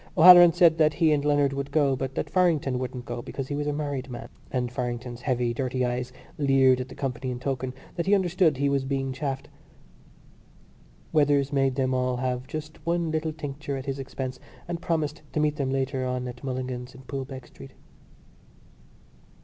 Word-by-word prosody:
O'Halloran 175 +1 +10
said 170 -2 +4
that 155 -1 +4
he 160 -2 +3
and 145 -1 +2
Leonard 145 -2 +2
would 140 0 -3
go, 140 -3 +2
but 135 0 -4
that - - -2
Farrington 160 -8 +2
wouldn't 125 -1 -5
go - - -4
because 130 +2 -6
he 145 - -2
was 145 0 -2
a - - +1
married 145 -3 -3
man; 120 - -7 0.2
and 125 -2 -2
Farrington's 120 -1 -4
heavy 120 -2 0
dirty 130 0 -1
eyes 125 +1 -2 0.3
leered 135 -2 +4
at 130 - -6
the 130 - -10
company 130 -1 -3
in 125 -1 -4
token 130 -1 -2 0.2
that 175 +1 -2
he 205 - +5
understood 175 -5 +2
he 140 +1 +1
was 140 -1 +1
being 135 -1 -2
chaffed. 135 0 -4 1.7
Weathers 145 -2 +3
made 135 -2 +2
them 130 -1 +1
all 125 -1 0
have 125 0 -2
just 155 0 -7
one 170 -1 0
little 160 0 -1
tincture 145 -2 -5
at 135 - -6
his 135 -1 -3
expense 130 -1 -5 0.3
and 170 -1 -4
promised 155 -2 -1
to - - 0
meet 150 0 +1
them 140 -3 -1
later 135 0 -1
on 125 0 -2
at 125 +1 -9
Mulligan's 130 -1 -4
in 130 - -13
Poolbeg 130 -1 -6
Street. 70 - -13
135 Hz, 190 wpm, -26 LUFS, 130-150 Hz, 1.7 s, O'Halloran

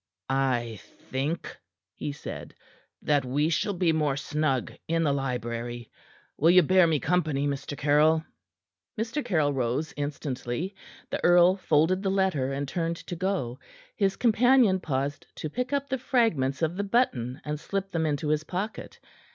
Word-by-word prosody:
"I 120 -5 0
think," 140 - -5 0.4
he 150 - -4
said, 140 - -8 0.5
"that 145 -2 +2
we 145 +5 +1
shall 205 +5 0
be 175 -2 +2
more 150 -3 +1
snug 145 -2 -1
in 165 0 +1
the 145 -3 +2
library. 120 -3 -4 0.5
Will 160 - +5
you 180 0 +7
bear 185 +2 +5
me 155 -3 +2
company, 155 -3 0
Mr. 140 0 -3
Caryll?" 155 +2 +3 0.7
Mr. 235 +6 -2
Caryll 155 -10 +1
rose 130 +4 -1
instantly. 145 +3 -3 0.4
The - - -3
earl 175 +1 +6
folded 180 0 +2
the 195 - 0
letter, 190 -9 +1
and 140 +1 -3
turned 165 +3 -1
to 175 - -7
go. 175 -9 -2 0.4
His 195 -2 +1
companion 240 -3 +4
paused 140 -3 -3
to 155 - -5
pick 250 - -3
up 280 -1 0
the 265 -2 -2
fragments 170 - +1
of 160 +3 0
the 200 - 0
button 145 - 0
and 150 0 -3
slip 195 +3 -3
them 160 -2 0
into 150 0 -1
his 155 0 +1
pocket. 190 +6 -5
155 Hz, 155 wpm, -27 LUFS, 135-185 Hz, 0.7 s, you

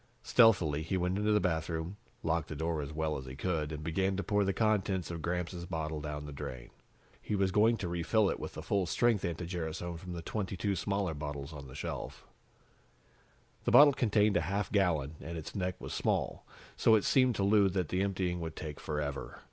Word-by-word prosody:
Stealthily, 90 -11 +4
he 85 +4 -1
went 90 +2 0
into 105 +1 +2
the 105 - +4
bathroom, 80 0 -1 0.3
locked 80 -1 0
the 75 - -6
door 80 +1 -1
as 70 +1 -5
well 80 0 -1
as 65 - -9
he 65 - -7
could 75 0 -1
and 75 0 -5
began 95 +4 0
to 100 - -1
pour 105 -1 +2
the 95 - +1
contents 95 -5 +1
of 85 -1 -5
Gramps' 90 +1 -2
bottle 80 -3 -3
down 75 0 -5
the 75 - -7
drain. 65 -4 -7 0.5
He 105 - -2
was 95 -1 +2
going 110 +4 +4
to 95 - -3
refill 85 +5 +2
it - - -1
with - - -6
full 100 -3 -1
strength 115 0 +2
anti 85 0 -2
gerasone 85 0 -4
from 90 0 -7
the 85 -1 -6
22 100 +1 -2
smaller 100 -1 -1
bottles 75 0 -5
on 70 -2 -8
the 65 - -11
shelf. - - -5 1.4
The - - +2
bottle 145 -1 +9
contained 105 -5 +3
a - - +2
half 100 +5 -2
gallon, 80 -7 +1
and 85 +1 -6
its 80 - -7
neck 90 -2 -1
was - - -6
small, - - -1 0.3
so 110 - +5
it 105 - +2
seemed 130 -3 +4
to 100 - 0
Lou 100 0 +5
that 90 -3 -1
the 90 - 0
emptying 95 -3 -1
would 80 -1 -5
take 75 -4 -6
forever. 75 -2 -4
90 Hz, 205 wpm, -32 LUFS, 80-100 Hz, 1.4 s, bottle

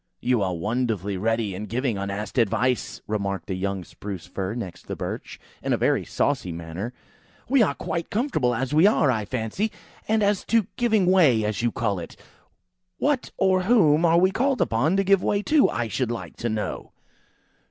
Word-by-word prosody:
"You 125 -3 +1
are 95 -2 0
wonderfully 105 0 -1
ready 110 +1 0
in 105 +3 -6
giving 120 +1 -1
unasked 100 +5 -3
advice!" 120 +3 0
remarked 100 -4 -2
the 95 - -3
young 95 0 -2
Spruce 95 -2 -8
fir 95 +2 -4
next 100 -8 -7
the - - -4
Birch, - - -6 0.2
in - - 0
a - - +2
very - - +2
saucy 90 - -1
manner. 85 +7 -5 0.6
"We 270 0 +4
are 215 - +2
quite 170 -1 -4
comfortable 200 - 0
as 135 +4 -2
we 160 +6 +6
are, 155 -10 +3
I 110 -4 -1
fancy; 130 - -2 0.4
and 220 -1 +2
as 200 -1 +1
to 230 -3 +2
giving 220 -5 +2
way, 155 - +4
as 105 +2 -1
you 120 0 +1
call 105 -5 -1
it, 85 - -8 0.8
what, 285 -3 0
or 190 -1 +3
whom 170 -9 +4
are 170 0 +5
we 185 +2 +4
called 265 +5 +1
upon 140 +12 +2
to 195 - +3
give 195 -1 +4
way 205 0 0
to, 300 +2 +4
I 120 -1 -2
should 125 +2 -1
like 120 - -5
to 120 - -2
know?" 110 -1 -4
120 Hz, 185 wpm, -24 LUFS, -, 0.8 s, we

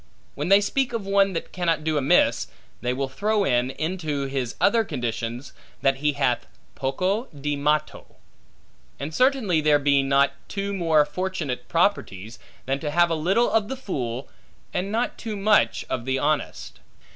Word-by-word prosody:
When 150 +5 -3
they 200 +1 +7
speak 245 +4 0
of 225 -4 -3
one 195 0 +3
that 165 - -4
cannot 165 -4 0
do 155 0 0
amiss, 140 -1 +3 0.3
they 125 - 0
will 135 +2 -1
throw 205 +10 0
in, 125 -5 +1
into 155 -2 -3
his 135 -3 -3
other 230 +2 +4
conditions, 120 - -4 0.3
that 135 0 +3
he 150 +1 +1
hath 125 -4 0 0.3
Poco 185 - -1
di 145 - -4
matto. 150 +1 -1 0.8
And 145 +4 -5
certainly 250 - +2
there 150 -1 +4
be 140 -1 +3
not 140 +1 +3
two 200 0 -3
more 165 -5 +3
fortunate 150 -6 -4
properties, 115 - 0 0.3
than 135 +1 -1
to 150 - -3
have 170 +3 +3
a - - +2
little 190 +10 +2
of 220 -2 +2
the 265 - -5
fool, 130 - -4 0.5
and 190 +3 -2
not 235 +3 -1
too 220 -2 -4
much 210 +1 +2
of 120 -2 -3
the 130 0 0
honest. 150 +2 -2
155 Hz, 165 wpm, -24 LUFS, 135-195 Hz, 0.8 s, they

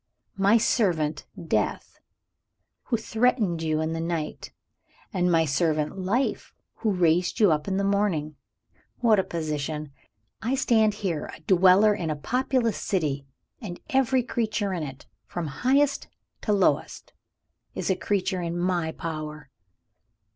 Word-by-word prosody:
My 200 +4 +5
servant 170 -10 +1 0.2
Death, - - -1 0.9
who 235 - 0
threatened 220 -6 +1
you 155 -1 0
in 160 +1 -1
the 165 - -3
night; 165 -2 -4 0.6
and 180 -2 +2
my 165 -1 +4
servant 150 +1 0
Life, 215 +9 -1 0.2
who 225 - -1
raised 180 +1 +2
you 205 -6 +6
up 150 -1 0
in 190 -1 0
the 200 - 0
morning. 195 -7 0 0.6
What 225 -4 +4
a - - +2
position! 155 -3 -4 0.5
I 245 +4 0
stand 220 -5 +3
here, 175 -8 -3
a - - -16
dweller 190 +5 +5
in 180 -6 -3
a 155 - -1
populous 250 - 0
city 145 -7 -1 0.3
and 180 -6 -7
every 265 -1 +3
creature 215 -5 -1
in 175 - -2
it, 140 -2 -7 0.2
from 175 - -4
highest 270 - +1 0.3
to 215 - -1
lowest, 200 -2 0 0.6
is - - -1
a - - +2
creature 185 0 -1
in 170 0 -3
my 175 -2 0
power!" 155 -3 -6
180 Hz, 140 wpm, -26 LUFS, 155-215 Hz, 0.9 s, you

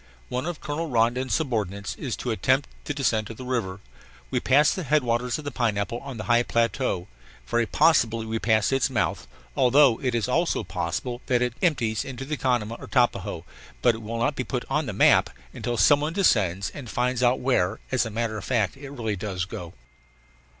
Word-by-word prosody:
One 125 +5 -2
of 175 -3 -5
Colonel 155 +2 -3
Rondon's 120 +2 +1
subordinates 105 - -2
is 125 -8 -4
to 120 - -3
attempt 130 +5 +1 0.2
the - - -2
descent 115 -6 0
of 115 - -8
the 130 - -8
river. 105 -7 -2 0.5
We - - +1
passed 140 +3 +4
the 185 - -3
headwaters 125 -6 +1
of 155 - -9
the 145 - -3
Pineapple 115 -2 -1
on 135 -2 -8
the 110 - -5
high 120 0 +3
plateau, 115 -5 0 0.4
very 120 -1 0
possibly 115 -8 +3
we 110 0 -2
passed 110 +2 +2
its 135 0 +2
mouth, 115 -6 -1 0.3
although 130 -1 +5
it 125 -3 0
is 115 -1 0
also 165 +7 +1
possible 90 +8 -3
that 125 -1 +2
it 125 -2 -1
empties 120 - +1
into 135 0 -6
the 150 +2 -2
Canama 120 -5 -1
or - - -9
Tapajos. 100 -9 0 0.4
But 120 - +5
it 110 - -8
will 115 +2 -5
not 115 - 0
be - - -2
"put - - -3
on - - 0
the - - -2
map" - - +5 0.2
until 120 -1 -3
some 145 +5 +5
one 155 +2 -2
descends 100 - +2
and 130 -5 -9
finds 125 +1 0
out 125 +1 +3
where, 110 -6 +1
as 130 -2 +2
a 115 - -4
matter 110 0 -2
of - - -9
fact, 115 -7 0
it 140 0 -9
really 115 -6 -3
does 95 -2 -3
go. 85 -2 -8
120 Hz, 200 wpm, -25 LUFS, 110-135 Hz, 0.5 s, although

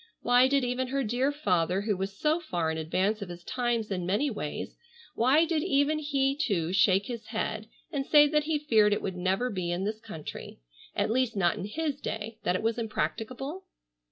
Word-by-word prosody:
Why 245 +1 +5
did 275 0 +2
even 250 +1 -1
her 275 +1 -1
dear 250 +5 +1
father 185 - +1
who 210 0 0
was 195 +1 -4
so 310 +6 +2
far 175 - -2
in 160 - -3
advance 190 +7 0
of 200 - -5
his 175 0 -9
times 240 -2 -1
in 180 -2 -1
many 210 +11 +1
ways, 150 -9 -5 0.4
why 270 +8 +4
did 325 -2 0
even 285 +2 +2
he 275 -2 +1
too 185 - 0
shake 195 0 +4
his 235 -2 -6
head 220 -1 -3 0.2
and 285 -4 -1
say 295 +1 +6
that 300 0 +1
he 315 -1 +1
feared 220 -8 +3
it - - -1
would 190 - -3
never 190 +7 0
be 185 -4 -3
in 175 +2 -1
this 215 +2 -2
country, 205 -9 -8 0.4
at - - +1
least 250 -1 +1
not 190 -3 +2
in - - -5
his 290 +5 -3
day, 220 +1 -5
that 180 - 0
it 185 - -2
was 225 +1 0
impracticable? 255 - -3
225 Hz, 205 wpm, -28 LUFS, 195-275 Hz, 0.4 s, say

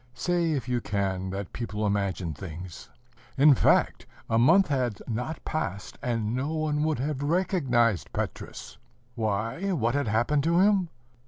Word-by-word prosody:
Say, 175 -2 0
if 130 -5 -3
you 125 -1 0
can, 95 -3 -2
that 95 0 -5
people 110 -3 -3
imagine 100 -5 -1
things! 85 +3 -9 0.5
In 145 +2 +7
fact, - - +2 0.2
a 115 - +3
month 170 +11 +5
had 125 -6 0
not 125 +7 -4
passed, 100 - -4
and 115 -2 -1
no 140 +5 -2
one 155 -1 0
would 155 -1 +1
have 140 +2 -2
recognized 140 - +1
Petrus. - - -5 0.3
Why, 115 - -2
what 120 -7 +1
had 140 -2 0
happened 120 +7 +1
to 170 +1 +3
him? 195 -3 +3
125 Hz, 150 wpm, -27 LUFS, 105-155 Hz, 0.5 s, In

